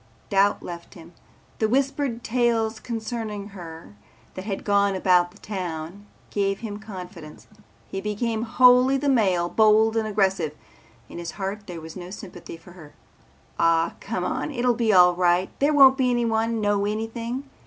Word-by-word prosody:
Doubt 200 +1 +2
left 170 -1 -9
him. 165 +2 -14 0.5
The 220 - +1
whispered 270 -1 0
tales 230 -2 0
concerning 220 -3 -5
her 165 - -10 0.4
that 185 - -8
had 200 -3 -4
gone 200 -1 +2
about 180 -2 +2
town 180 0 -6 0.2
gave 195 0 -1
him 210 -3 -6
confidence. 180 -7 -10 0.4
He 195 - -5
became 220 +2 -2
wholly 250 +3 +5
the 285 +2 -2
male, 190 -9 +2
bold 220 +3 +4
and 220 -1 0
aggressive. 190 -7 0 0.5
In - - -9
his 170 -1 -6
heart 200 +1 -5
there 175 -3 -7
was 160 0 -10
no 180 -1 -8
sympathy 180 -4 -9
for 165 +2 -16
her. 160 -5 -14 0.6
"Ah, 165 0 +2
come - - -4
on, - - -2
it'll 250 -3 +1
be 230 -2 +1
all 180 -2 +6
right. 180 +1 +1
There 285 +2 +3
won't 270 -2 +6
be 255 -1 +3
anyone 230 -1 0
know 205 -1 +1
anything. 230 +5 -4
205 Hz, 155 wpm, -24 LUFS, 180-230 Hz, 0.6 s, all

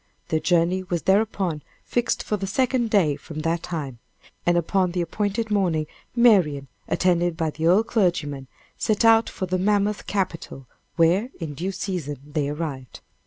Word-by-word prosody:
Their 160 - +1
journey 175 +2 +2
was 175 -2 -3
thereupon 190 -5 +1 0.2
fixed 240 -1 -1
for 210 - -1
the 195 -1 -4
second 245 +2 +1
day 175 -9 +3
from 155 +1 -8
that 165 +1 0
time. 140 -8 -5 0.5
And 175 0 +4
upon 180 +1 +1
the 180 - 0
appointed 210 +5 -2
morning 175 -7 +1 0.3
Marian, 180 - +4 0.2
attended 175 -2 +1
by 160 -2 0
the 160 +2 -1
old 195 +6 +4
clergyman, 155 - 0 0.3
set 215 0 +1
out 225 0 +5
for 190 - -4
the 185 0 -1
mammoth 205 +1 +1
capital, 175 -8 -3 0.3
where, 175 +8 +3
in 160 -4 -5
due 180 +7 -3
season, 175 -7 -4 0.2
they 145 -3 0
arrived. 145 -5 -5
180 Hz, 160 wpm, -24 LUFS, 160-205 Hz, 0.5 s, out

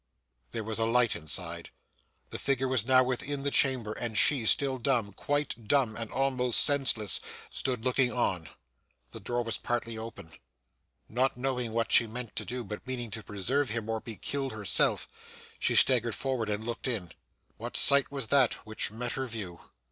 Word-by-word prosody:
There 115 - -4
was 110 +1 -3
a 115 - +2
light 120 0 +2
inside. 80 -3 -3 0.6
The - - -5
figure 135 -1 0
was 130 -3 0
now 130 0 +6
within 135 +2 -3
the 140 - 0
chamber, 130 -7 +2
and 115 -2 -4
she, 130 -6 +4
still 135 +1 +4
dumb 115 -5 0
quite 145 -3 -2
dumb, 130 -5 +2
and 115 -1 -5
almost 130 -3 +1
senseless 130 -8 +3 0.3
stood 125 -3 -2
looking 125 0 +2
on. 90 -9 -1 0.6
The - - -8
door 120 0 -2
was 115 -1 -3
partly 115 -2 -3
open. 110 -7 -9 0.8
Not 125 +3 0
knowing 125 -2 -2
what 115 +1 -1
she 115 - +6
meant 120 +1 -7
to - - -1
do, 125 0 -4
but 105 +4 -8
meaning 120 -3 -4
to 110 - -4
preserve 120 +8 -1
him 110 0 -3
or 110 -1 -2
be 115 - -8
killed 135 +1 -4
herself, 105 -3 +2 0.5
she - - +1
staggered 120 -3 +5
forward 130 -5 -2
and 105 +1 -2
looked 120 +3 -4
in. 100 -9 -3 0.5
What - - -4
sight 140 -1 +5
was 135 -5 -3
that 135 -4 +4
which 110 0 +1
met 115 +3 -5
her 130 0 -3
view! 100 -7 -7
120 Hz, 180 wpm, -29 LUFS, 110-130 Hz, 0.8 s, now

